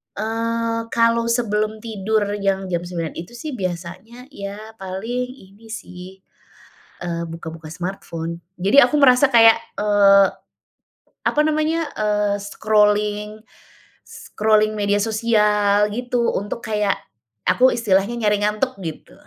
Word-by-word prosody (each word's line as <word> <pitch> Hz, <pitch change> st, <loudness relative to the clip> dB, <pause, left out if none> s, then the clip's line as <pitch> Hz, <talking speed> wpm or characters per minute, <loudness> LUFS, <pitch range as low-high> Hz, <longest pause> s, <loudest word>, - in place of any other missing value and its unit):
Eee, 230 Hz, +1 st, -2 dB
kalau 230 Hz, 0 st, +3 dB
sebelum 215 Hz, -2 st, -1 dB
tidur 220 Hz, -1 st, -1 dB, 0.2 s
yang 195 Hz, -1 st, -1 dB
jam 175 Hz, -, 0 dB
jam 170 Hz, -, -8 dB
09.00 170 Hz, -3 st, -5 dB
itu 170 Hz, +8 st, -8 dB
sih 255 Hz, +1 st, -6 dB
biasanya 185 Hz, -, -6 dB
ya 210 Hz, 0 st, -9 dB
paling 205 Hz, +7 st, -4 dB
ini 205 Hz, -2 st, -18 dB
sih, 185 Hz, -2 st, -10 dB, 0.9 s
eee, 170 Hz, -1 st, -3 dB
buka-buka 160 Hz, -1 st, -8 dB
smartphone, 170 Hz, -1 st, -6 dB, 0.2 s
jadi 200 Hz, +10 st, +5 dB
aku 300 Hz, -, +1 dB
merasa 270 Hz, 0 st, +5 dB
kayak, 225 Hz, -2 st, +7 dB, 0.2 s
eee, 200 Hz, -1 st, +5 dB, 1.0 s
apa 300 Hz, -, +1 dB
namanya, 310 Hz, +1 st, 0 dB
eee, 210 Hz, -1 st, 0 dB
scrolling, 210 Hz, 0 st, +1 dB, 0.6 s
scrolling 215 Hz, 0 st, 0 dB
media 205 Hz, -1 st, 0 dB
sosial 210 Hz, -1 st, +2 dB
gitu 245 Hz, +1 st, -1 dB
untuk 205 Hz, +4 st, -4 dB
kayak 210 Hz, -2 st, 0 dB, 0.5 s
aku 255 Hz, +1 st, +4 dB
istilahnya 210 Hz, 0 st, +1 dB
nyari 210 Hz, -1 st, +2 dB
ngantuk 210 Hz, +3 st, -1 dB
gitu. 160 Hz, -4 st, -7 dB
210 Hz, 120 wpm, -21 LUFS, 195-230 Hz, 1.0 s, kayak